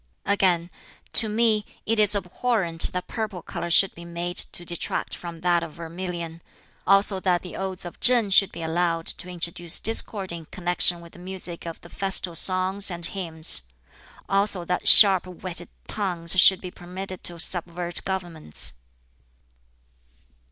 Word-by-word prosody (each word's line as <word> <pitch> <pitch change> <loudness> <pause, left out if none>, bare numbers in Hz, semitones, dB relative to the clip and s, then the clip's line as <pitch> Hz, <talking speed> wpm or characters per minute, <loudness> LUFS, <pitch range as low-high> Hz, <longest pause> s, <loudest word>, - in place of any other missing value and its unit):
Again, 185 -4 +1 0.4
"To 220 - +7
me 215 -1 +1 0.2
it 225 0 0
is 210 -1 +8
abhorrent 190 -3 -1
that 180 -1 -5
purple 215 -7 -5
color 170 -1 -6
should 185 +3 +4
be 170 - -12
made 170 +1 -6
to 175 - -1
detract 175 -1 -4
from 170 -2 -10
that 175 -1 +1
of 165 -2 -8
vermilion. 170 0 -7 0.5
Also 195 0 +2
that 180 -2 0
the 180 - -9
Odes 190 -1 -6
of 175 - -10
Ch'ing 240 -5 +3
should 195 -1 +4
be 165 - -8
allowed 165 0 -1
to 180 - -3
introduce 175 -1 0
discord 210 -4 +1
in 170 -2 -8
connection 175 0 -1
with 170 0 -15
the - - -15
music 180 -2 -8
of 165 - -8
the 170 - -15
Festal 195 -2 -1
Songs 185 +3 +3
and 170 -2 -5
Hymns. 165 - +4 0.7
Also 195 -2 -1
that 180 - -2
sharp 190 -3 +8
whetted 175 -1 -6 0.2
tongues 175 -5 -2
should 190 -1 +5
be 180 - -8
permitted 185 +2 -9
to 175 - -1
subvert 175 0 -2
governments." 175 - -2
180 Hz, 150 wpm, -23 LUFS, 170-195 Hz, 0.7 s, is